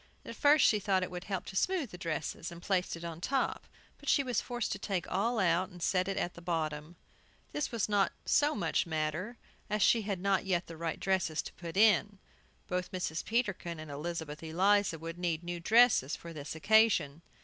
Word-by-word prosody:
At - - -7
first 290 0 +5
she 210 - +4
thought 190 -2 +1
it 185 - -4
would 180 0 -6
help 195 -2 -3
to 190 - -8
smooth 335 - 0
the 180 - -8
dresses, 165 0 -4
and 170 - -9
placed 185 -1 0
it 165 - -10
on 165 -1 -6
top; 270 +7 -1 0.3
but - - -5
she 280 - +4
was 250 -2 0
forced 240 -3 -3
to 200 - -3
take 195 -4 -2
all 225 +6 +1
out, 185 -2 +2
and 180 -2 -13
set 185 +1 +1
it 195 - -2
at 175 - -1
the 170 - -12
bottom. 160 -1 -3 0.6
This 295 - -2
was 230 -4 0
not 205 -2 +2
so 295 +1 +3
much 200 - 0
matter, 160 +8 -2 0.3
as 210 -1 +1
she 230 - +5
had 200 -3 -3
not 195 +1 +1
yet 185 -2 0
the 165 - -9
right 165 0 -3
dresses 185 -5 0
to - - -9
put 170 +1 -7
in. 205 -1 +4 0.5
Both 180 0 -2
Mrs. 175 -3 -3
Peterkin 190 -8 -1
and 155 -2 -8
Elizabeth 155 0 -5
Eliza 185 +3 +2
would 165 +2 -7
need 170 -2 -1
new 175 0 -4
dresses 220 - +4
for 170 0 -10
this 145 0 -6
occasion. 195 -5 +3
180 Hz, 205 wpm, -32 LUFS, 165-205 Hz, 0.6 s, first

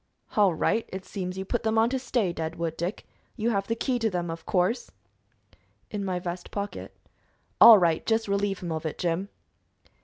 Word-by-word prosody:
"All 200 -5 +4
right. 225 +7 +1
It 190 0 -6
seems 185 -1 -5
you 190 - -4
put 240 +4 -1
them 220 -1 0
on 225 +1 +5
to 265 - 0
stay, 230 -8 0
Deadwood 165 0 -3
Dick. 175 +5 -4 0.3
You 230 +1 0
have 195 -2 -1
the 230 - 0
key 245 +1 -1
to 225 -1 +1
them, 175 -3 -2
of 165 - -8
course." 190 +6 +1 1.0
"In 205 -2 -3
my 185 -2 -1
vest 175 0 -5
pocket." 200 0 -6 0.6
"All 230 -2 +11
right. 170 -4 +2
Just 225 -1 +1
relieve 200 -1 -1
him 170 - -3
of 160 0 -3
it, 155 - -4
Jim." 180 +3 -1
195 Hz, 190 wpm, -27 LUFS, 175-220 Hz, 1.0 s, All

